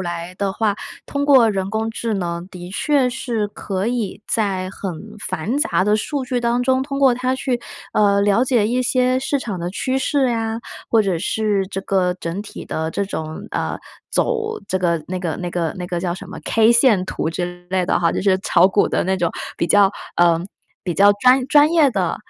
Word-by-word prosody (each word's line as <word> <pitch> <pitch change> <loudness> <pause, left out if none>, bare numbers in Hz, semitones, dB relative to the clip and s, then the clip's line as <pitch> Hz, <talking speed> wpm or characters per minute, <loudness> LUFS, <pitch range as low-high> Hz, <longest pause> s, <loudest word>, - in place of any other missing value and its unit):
来 175 0 -4
的 200 -1 -1
话， 210 -1 0 0.3
通 285 0 -2
过 260 -6 +6
人 195 -2 -2
工 220 +1 -1
智 225 -1 -3
能 170 -2 -3
的 180 -1 -9
确 265 +4 +1
是 230 -4 -2
可 195 +1 -3
以 220 -5 -3
在 190 -4 -1
很 195 -2 -5 0.4
繁 225 - -2
杂 295 - +1
的 210 +2 +3
数 270 +5 -3
据 250 -1 -1
当 240 +1 +1
中， 260 +1 +2
通 275 -1 -4
过 265 -3 +6
它 255 +1 0
去 255 -2 -2 0.3
呃， 200 -1 +3
了 205 +4 +3
解 240 -5 +2
一 250 +2 +1
些 255 +1 +2
市 270 +1 -1
场 205 -7 -4
的 170 +1 -3
趋 260 +6 -1
势 265 -2 +1
呀， 225 0 -2 0.3
或 225 -2 +4
者 185 -4 0
是 205 0 0
这 195 0 -4
个 185 -2 +1
整 175 +1 -5
体 210 - -9
的 160 0 -3
这 200 - -1
种 160 -5 -6
呃， - - -2 0.3
走 445 -2 -1
这 190 - 0
个 170 -3 0
那 185 0 -3
个 170 -3 -2
那 180 -1 -4
个 170 0 -2
那 180 - -5
个 175 - -2
叫 175 -1 -2
什 - - -10
么 - - -7
K 225 +1 +4
线 235 -6 +4
图 160 - -3
之 175 +1 -5
类 185 -1 +1
的 - - +1
哈， 170 -1 +2
就 - - -2
是 190 -1 +3
炒 185 0 +4
股 200 - +2
的 - - 0
那 190 +1 0
种 170 -2 0 0.2
比 170 - 0
较 200 +2 +5 0.2
呃， 170 -1 +4 0.4
比 175 - -2
较 200 +3 +6
专 255 +5 +4
专 295 +2 +5
业 310 -5 +5
的。 185 -6 -1
205 Hz, 225 characters per minute, -20 LUFS, 180-250 Hz, 0.4 s, 过